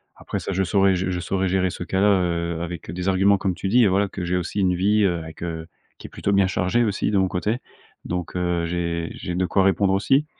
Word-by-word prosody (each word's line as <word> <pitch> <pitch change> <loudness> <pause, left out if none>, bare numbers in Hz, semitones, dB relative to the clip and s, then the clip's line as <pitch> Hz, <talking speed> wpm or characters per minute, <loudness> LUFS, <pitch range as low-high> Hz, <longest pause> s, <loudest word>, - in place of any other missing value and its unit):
après - - -5
ça - - -4
je 95 - +1
saurais 95 0 +3
je 95 +1 -1
je 90 -1 -2
saurais 95 +1 -1
gérer 95 0 +1
ce 90 - -6
cas 95 +2 -2
là, 100 - +4
heu, 85 -4 +1
avec 85 -1 -6
des 90 +2 -2
arguments 95 +2 +4
comme 95 -1 -1
tu 95 - -4
dis, 120 +5 +4
heu, - - +4
voilà 100 +2 +2
que 95 -1 -6
j'ai 90 +1 0
aussi 90 +3 -2
une 90 -1 +2
vie, 105 +4 +2
heu, 90 -3 +2
avec, 80 +1 -9
heu, 80 -1 -5 0.3
qui - - -10
est - - -15
plutôt 100 - -2
bien 100 -1 +4
chargée 95 +5 +1
aussi 105 -1 -1
de 100 - +2
mon 95 - +3
côté, 105 +5 -1 0.5
donc 90 -1 -4
heu, 90 -1 0
j'ai 85 -1 -2
j'ai 90 - -5
de 90 +1 +1
quoi 95 +2 +2
répondre 95 0 +2
aussi, 135 +10 +2
95 Hz, 260 wpm, -23 LUFS, 90-100 Hz, 0.5 s, là